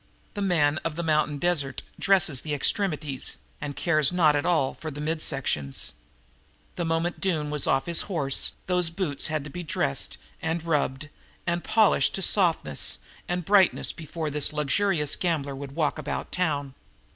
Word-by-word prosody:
The 205 - -4
man 155 -6 +2
of 165 -2 -4
the 170 - -3
mountain 155 -2 +1
desert 145 -5 +1 0.2
dresses 185 -9 +3
the 150 -2 -3
extremities 150 -4 0 0.2
and 145 -2 -5
cares 155 -3 +3
not 160 -4 +4
at 145 - 0
all 160 -7 +2
for 160 - -7
the 145 -1 -8
mid 155 +1 -1
sections. 75 - -1 0.8
The 175 - -2
moment 165 +1 -1
Doone 155 -6 0
was 150 -2 0
off 135 0 +2
his 170 -1 +4
horse 145 -8 +1
those 180 -2 +2
boots 165 -5 -1
had 155 -2 -2
to 145 - -9
be 175 - -6
dressed 150 - -2 0.2
and 160 0 -2
rubbed 145 -2 -1 0.4
and 170 0 -1
polished 220 -2 +3
to 195 - -1
softness 180 -5 +3 0.3
and 180 -1 -2
brightness 195 -2 +4
before 160 -1 -5
this 150 0 +1
luxurious 150 +1 +1
gambler 150 -6 -1
would 140 0 -8
walk 155 -1 0
about 150 - -4
town. 145 -6 -1
155 Hz, 165 wpm, -26 LUFS, 145-175 Hz, 0.8 s, not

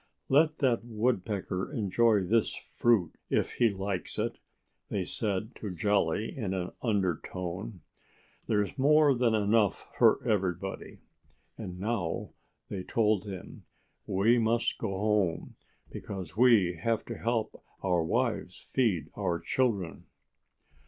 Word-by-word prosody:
"Let 155 +3 +4
that 125 -5 +2
Woodpecker 105 -5 -1
enjoy 110 +1 +2
this 110 +4 +1
fruit 110 -9 +1 0.2
if - - +1
he 120 - +5
likes 95 -2 -4
it," - - -2 0.5
they - - -1
said 105 +1 -2
to 105 - -5
Jolly 100 +1 0
in 100 -7 -2
an 90 -1 -3
undertone. 95 -2 -2 0.7
"There's 105 +1 0
more 150 +1 +5
than 120 -3 +2
enough 105 -1 +1
for - - +5
everybody. 95 -2 -2 0.5
And 90 -1 -7
now," 100 -5 -2 0.4
they 95 - -4
told 105 0 +1
him, 95 -3 -8 0.4
"we 110 +6 +3
must 115 +1 +1
go 110 - -2
home, 100 -3 0 0.4
because 95 -5 -7
we 105 -8 +5
have 115 +6 -1
to - - -5
help 115 -1 -2 0.2
our 90 -3 +2
wives 110 -1 -1
feed 95 - 0
our 90 -4 -1
children." 105 -9 -1
105 Hz, 120 wpm, -30 LUFS, 95-115 Hz, 0.7 s, he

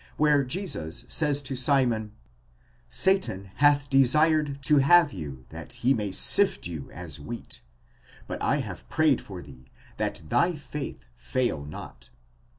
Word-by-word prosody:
where 150 -2 +4
Jesus 130 - -4
says 145 -2 +1
to 135 0 -4
Simon: 125 -5 +1 0.8
Satan 100 - 0
hath 145 0 +4
desired 145 +2 +3
to 150 +2 +4
have 145 +2 +5
you 70 -8 -8
that 80 +8 -9
he 125 +2 +2
may 105 -5 -2
sift 60 -9 +3
you 80 -5 -6
as 85 -4 -8
wheat; 115 +10 -8 0.6
but - - -6
7 - - +1
have - - -9
prayed 155 -5 +2
for 95 -3 -9
thee 65 -3 -15 0.3
that - - -3
thy 170 - +2
faith 145 - -7
fail 70 - -2
not. - - -10
125 Hz, 140 wpm, -26 LUFS, -, 0.8 s, have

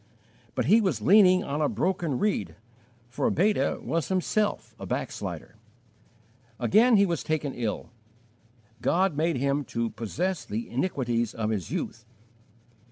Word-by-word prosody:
But - - 0
he 220 +6 +5
was 155 - -1
leaning 185 - +6
on 145 +2 -3
a 150 - +2
broken 175 -7 -1
reed, 100 - -1 0.5
for 120 - -1
Beta 180 -5 +1
was 160 +5 -1
himself 200 +3 -1
a - - -7
backslider. - - -5 1.0
Again 215 - +5
he 200 - +5
was 170 -5 -1
taken 155 -3 -2
ill. 115 -1 -4 0.9
God 180 +2 +2
made 160 0 +1
him 140 +2 0
to 115 -1 -2
"possess 175 - -3
the 110 +3 -4
iniquities 120 - -1
of 110 -1 -1
his 100 -7 -3
youth." 115 - -4
150 Hz, 135 wpm, -27 LUFS, 120-185 Hz, 1.0 s, leaning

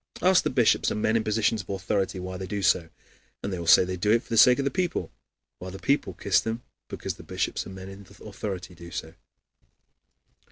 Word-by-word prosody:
Ask 185 0 +5
the - - -1
bishops 125 -4 +3
and - - -2
men 110 +1 +1
in 115 - +2
positions 110 0 +1
of 95 - -19
authority 95 0 -1
why 95 0 -6
they 95 0 -6
do 100 +1 -3
so, 85 -3 +3 0.5
and 100 - -3
they 90 - -3
will 85 - -6
say 90 - +7
they 90 0 -4
do 105 +4 -1
it 115 +1 +3
for - - -22
the 115 - -1
sake 125 +3 +7
of 140 - -1
the 140 - +1
people, 175 - -2 0.5
while 90 - -7
the 95 - -8
people 135 -5 0
kiss - - +2
them 115 +2 -4 0.2
because - - -5
the - - -11
bishops - - -3
and 95 - -9
men 95 0 -9
in 95 0 -10 0.3
authority 95 -3 -6
do 85 0 -11
so. 80 -2 -6
95 Hz, 230 wpm, -26 LUFS, 95-115 Hz, 0.5 s, say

